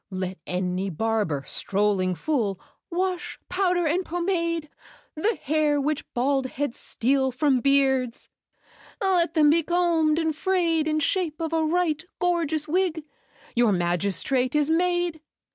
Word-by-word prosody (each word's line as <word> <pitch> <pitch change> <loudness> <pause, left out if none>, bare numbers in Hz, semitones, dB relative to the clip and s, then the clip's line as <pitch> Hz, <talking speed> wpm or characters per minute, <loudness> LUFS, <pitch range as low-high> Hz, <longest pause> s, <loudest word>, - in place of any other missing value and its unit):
"Let 185 -1 -4
any 180 +1 -2
barber, 200 -6 -1
strolling 195 -2 0
fool, 220 - -1 0.3
Wash, 365 0 -2
powder, 360 -2 +1
and 340 +5 +1
pomade 335 -2 -1 0.5
The 420 +9 0
hair 300 0 +1
which 295 +1 -2
bald 265 +2 +1
heads 270 -1 -4
steal 265 +2 0
from 265 0 +2
beards, 265 -2 +1 0.7
Let 370 -5 +1
them 300 -2 +5
be 335 +2 +4
combed 330 -2 +2
and 320 -2 0
frayed 335 -3 +1
In 310 0 +1
shape 340 -1 0
of 330 -1 -3
a 325 -1 +2
right 325 -1 0 0.2
gorgeous 330 -4 0
wig— 340 -1 0 0.5
Your 235 -2 +4
magistrate 200 - 0
is 300 +1 +2
made. 350 -1 +1
305 Hz, 130 wpm, -25 LUFS, 245-340 Hz, 0.7 s, them